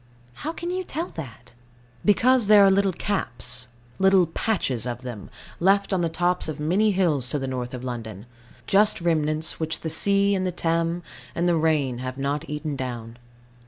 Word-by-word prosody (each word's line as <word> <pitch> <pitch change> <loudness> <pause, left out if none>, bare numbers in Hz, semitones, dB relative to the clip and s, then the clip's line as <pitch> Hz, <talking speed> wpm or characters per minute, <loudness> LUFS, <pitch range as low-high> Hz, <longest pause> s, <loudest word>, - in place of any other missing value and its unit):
How 315 - -2
can 345 +1 -5
you 370 +1 -2
tell 335 0 -4
that? 125 -5 -10 0.5
Because 240 +2 +4
there 205 -1 +8
are 195 - +6
little 195 0 +3
caps 180 - -4 0.3
little 190 -1 +5
patches 165 - -1
of 120 +1 -5
them 120 -6 -7 0.3
left 195 +2 +3
on 185 - +1
the 170 - +1
tops 175 +2 0
of 155 -1 -5
many 185 +8 +2
hills 165 - +1
to 145 - -1
the 135 - -3
north 125 -1 -4
of 125 - -7
London; 110 -5 -6 0.4
just 210 +2 +3
remnants 155 -2 0
which 160 0 -2
the 160 - -3
sea, 200 +4 +3
and 190 -1 0
the - - -1
Thames, 170 0 -1 0.3
and 175 +1 +1
the 175 - +3
rain 150 -6 +1
have 130 0 -5
not 140 +3 -2
eaten 150 0 -3
down. 120 -3 -6
165 Hz, 180 wpm, -24 LUFS, 130-195 Hz, 0.5 s, there